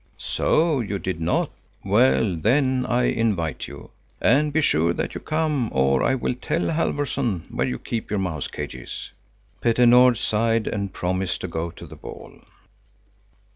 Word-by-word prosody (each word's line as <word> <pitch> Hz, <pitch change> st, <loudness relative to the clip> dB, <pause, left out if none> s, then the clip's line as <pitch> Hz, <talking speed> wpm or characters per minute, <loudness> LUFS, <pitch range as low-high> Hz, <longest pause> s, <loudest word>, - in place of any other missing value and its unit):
"So, 155 Hz, -3 st, +1 dB
you 105 Hz, -4 st, -2 dB
did 95 Hz, -3 st, -4 dB
not. 85 Hz, +2 st, 0 dB, 0.3 s
Well, 65 Hz, +7 st, +3 dB
then 130 Hz, -, +2 dB
I 125 Hz, 0 st, +2 dB
invite 100 Hz, -11 st, 0 dB
you. 70 Hz, 0 st, -11 dB, 0.3 s
And 145 Hz, +5 st, +3 dB
be 155 Hz, -, +2 dB
sure 85 Hz, -, +2 dB
that -, -, -3 dB
you -, -, -6 dB
come, 155 Hz, -6 st, 0 dB
or 65 Hz, 0 st, +2 dB
I 130 Hz, -, +2 dB
will 125 Hz, -, -1 dB
tell 160 Hz, +7 st, -1 dB
Halfvorson 140 Hz, -, -1 dB
where 65 Hz, -, 0 dB
you 65 Hz, -1 st, -2 dB
keep 115 Hz, -, -4 dB
your 105 Hz, -, -1 dB
mouse 85 Hz, -7 st, -2 dB
cages." 65 Hz, -1 st, -7 dB, 0.5 s
Petter 120 Hz, +1 st, +3 dB
Nord 125 Hz, 0 st, +6 dB
sighed 115 Hz, +1 st, +1 dB
and 100 Hz, -2 st, -2 dB
promised 95 Hz, +1 st, -2 dB
to -, -, -3 dB
go 85 Hz, 0 st, -3 dB
to 85 Hz, -, -11 dB
the -, -, -11 dB
ball. -, -, -11 dB
110 Hz, 160 wpm, -23 LUFS, 85-125 Hz, 0.5 s, Nord